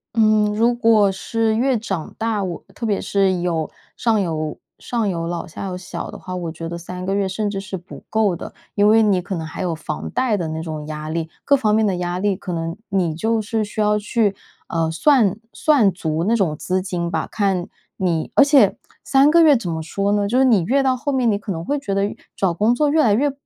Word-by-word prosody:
嗯， 215 -2 +3
如 235 +3 +3
果 225 -4 +4
是 225 +3 -1
越 255 +2 +2
长 195 -7 -4
大， 220 -3 -1
我 180 -3 -5
特 230 - -5
别 205 -2 0
是， 190 -3 +1
有 165 -3 -1 0.3
上 225 -2 +2
有 155 -3 -3 0.2
上 230 -3 -2
有 165 -2 -2
老 170 -1 -3
下 180 +5 -7
有 180 -1 -4
小 175 -1 -6
的 - - -8
话， 185 0 -7
我 170 -2 -4
觉 165 +1 -6
得 170 - -5
3 180 +2 -7
个 195 - -1
月 200 -1 +1
甚 205 +2 -2
至 195 -1 -3
是 195 0 -5
不 175 +3 -12
够 215 -5 +2
的。 - - -8 0.2
因 205 0 +3
为 225 +1 +6
你 195 -4 +2
可 185 +2 -5
能 160 -1 -4
还 160 - -7
有 175 -3 -1
房 155 -1 -5
贷 255 -5 +1
的 170 -3 -2
那 160 0 -4
种 155 -2 -6
压 155 0 -5
力， 165 0 -3
各 280 - +4
方 215 -6 +2
面 220 0 +3
的 190 -3 0
压 175 0 -2
力 200 0 +1
可 185 - -7
能， 165 0 -3
你 185 -5 0
就 220 +7 0
是 215 +1 -1
需 210 +1 -7
要 210 0 +2
去， 210 -1 0 0.3
呃 165 -1 0
算 210 - +3 0.2
算 270 -10 +3
足 160 -2 -2
那 225 +4 +2
种 180 -8 +1
资 185 +4 -1
金 175 -2 -3
吧， 160 - -1
看 195 -4 0 0.3
你 170 -4 -1
而 - - +8
且 280 0 +4 0.3
3 275 +1 +4
个 335 +2 +6
月 300 -3 +7
怎 230 -8 -2
么 160 -1 -3
说 200 +5 -1
呢， 205 -1 +1
就 250 +5 +3
你 225 -9 +4
越 270 +10 +2
到 260 -1 +2
后 285 +3 -2
面， 255 -3 +2
你 200 - +1
可 205 0 -6
能 165 -2 -4
会 290 +11 -1
觉 210 -8 -3
得 195 0 +1
越 205 - -4 0.2
找 190 -3 +1
工 215 +7 +2
作 300 +3 +2
越 310 +2 +3
来 220 -8 +4
越， 280 +7 +2
200 Hz, 255 characters per minute, -21 LUFS, 175-225 Hz, 0.3 s, 而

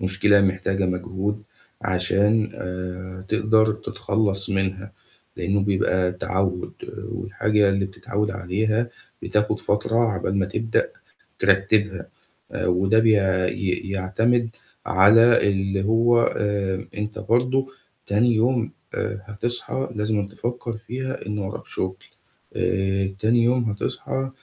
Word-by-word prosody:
مشكلة 100 +2 +3
محتاجة 95 0 +1
مجهود 95 +3 -2 0.4
عشان، 100 +4 +2
آآ 90 0 -6
تقدر 110 0 +3
تتخلص 100 -2 -2
منها، 95 0 -2 0.4
لأنه 100 +1 0
بيبقى 95 -2 +1
تعود، 90 0 -2 0.4
والحاجة 105 -1 +1
اللي 100 0 +1
بتتعود 105 +2 -3
عليها 110 +6 -1 0.3
بتاخد 105 0 0
فترة 105 +2 0 0.2
عقبال 95 +1 -1
ما 95 - +1
تبدأ 110 +3 0 0.5
ترتبها، 95 -1 +2 0.4
آآ - - -2
وده 95 +5 +3
بي 110 0 +4
ي 95 0 0
يعتمد 115 +5 +1 0.4
على 110 +4 +6
اللي 95 0 0
هو، 115 +2 +4
آآ 100 -1 -1
أنت 105 +1 -4
برضو 125 +4 +1 0.4
تاني 115 +4 +3
يوم، 120 +1 +1 0.2
آآ - - -2
هتصحى 120 +5 -3
لازمًا 105 -1 0
تفكر 120 +2 -4
فيها 130 +4 -5
إن 105 0 -3
وراك 95 -1 -5
شغل. 95 0 -3 0.6
آآ 95 +1 0
تاني 115 +3 +3
يوم 125 +1 +2
هتصحى 125 +4 -3
100 Hz, 115 wpm, -23 LUFS, 95-110 Hz, 0.6 s, على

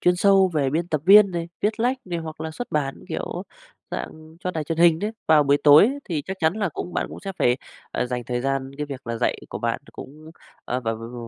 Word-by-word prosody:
chuyên 180 0 +3
sâu 195 0 +5
về 140 -4 +1
biên 165 +3 -1
tập 155 -4 0
viên 200 +1 +8
này, 170 -1 -4
viết 215 +2 0
lách 250 +3 +2
này, 175 -4 -3
hoặc 160 -1 -7
là 160 0 -4
xuất 245 +10 -6
bản, 140 -3 -1
kiểu - - -4 0.5
dạng, 155 - -7
cho 180 - -2
đài 160 -3 -3
truyền 165 +2 -3
hình 170 -1 +5
đấy. 210 +4 -2 0.2
Vào 155 -2 +6
buổi 140 0 +3
tối 145 +1 +9
ấy 275 +4 -2
thì 160 -5 -3
chắc 190 - -4
chắn 160 +1 +2
là 205 -3 0
cũng 175 +3 -6
bạn - - 0
cũng - - -9
sẽ 195 0 -5
phải, 120 0 +3 0.3
ờ, 125 - -1
dành 125 -1 -4
thời 120 +1 -2
gian 135 0 -2
cái 150 0 -3
việc 140 -3 -8
là 115 0 -2
dạy 120 - 0
của - - -5
bạn - - -1
th - - -22
cũng, 155 +3 -11 0.3
ờ, 125 - -2
v - - -19
v 115 +2 -4
160 Hz, 260 wpm, -23 LUFS, 135-180 Hz, 0.5 s, tối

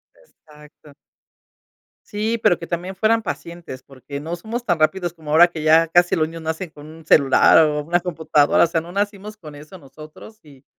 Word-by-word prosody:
Exacto. 150 - -20 1.1
Sí, 220 +2 -2
pero 175 - +2
que 170 - -9
también 180 +2 -5
fueran 225 +4 +1
pacientes, 170 - -8
porque 140 +1 -10
no 165 +4 -5
somos 230 +7 -7
tan 175 -6 0
rápidos 175 +2 0
como 155 -3 -10
ahora 170 +3 +6
que 165 -3 -8
ya 160 +1 +4
casi 175 +2 +2
los 155 -2 0
niños 165 +1 -10
nacen 160 +3 -5
con 150 -1 -14
un 160 0 -14
celular 140 +1 +5
o 150 -1 -2
una 175 +3 0
computadora, 160 -4 +1
o - - +3
sea, 165 0 -2
no 170 +2 -12
nacimos 205 +2 -4
con 155 -6 -12
eso 150 +6 -13
nosotros. 155 +8 -15
Y, 140 -3 -19
165 Hz, 190 wpm, -20 LUFS, 150-185 Hz, 1.1 s, ahora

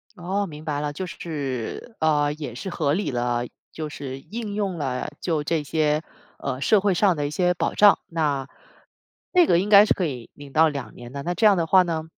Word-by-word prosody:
哦， 195 +2 -2
明 155 -2 -10
白 150 -2 -1
了， 150 0 -2
就 185 +6 -4
是， 145 - -5
呃， 150 -2 +2
也 145 -6 -7
是 190 - -5
合 155 -5 0
理 195 0 -1
了， 120 -1 -1 0.3
就 155 -1 -5
是 135 -2 -7
应 215 - -6
用 195 -4 -2
了 130 -4 -3
就 160 -4 -1
这 160 +1 0
些， 150 +1 +1 0.4
呃， 130 -2 -3
社 210 +9 +4
会 200 -1 +2
上 185 0 +3
的 145 -2 -1
一 - - -4
些 180 +3 +2
保 175 - -1
障。 205 -1 +6
那， 145 -5 -1 0.8
那 360 -2 +6
个 170 - +4
应 195 +3 -2
该 205 0 +9
是 - - +3
可 185 - -1
以 125 -6 -7
领 145 -1 -12
到 160 +1 +5
2 140 -6 -6
年 120 0 -10
的。 140 +1 -5
那 175 +5 -2
这 215 - +2
样 205 -2 +7
的 170 -3 0
话 185 +2 +6
呢， 165 -3 -2
155 Hz, 230 characters per minute, -24 LUFS, 140-185 Hz, 0.8 s, 该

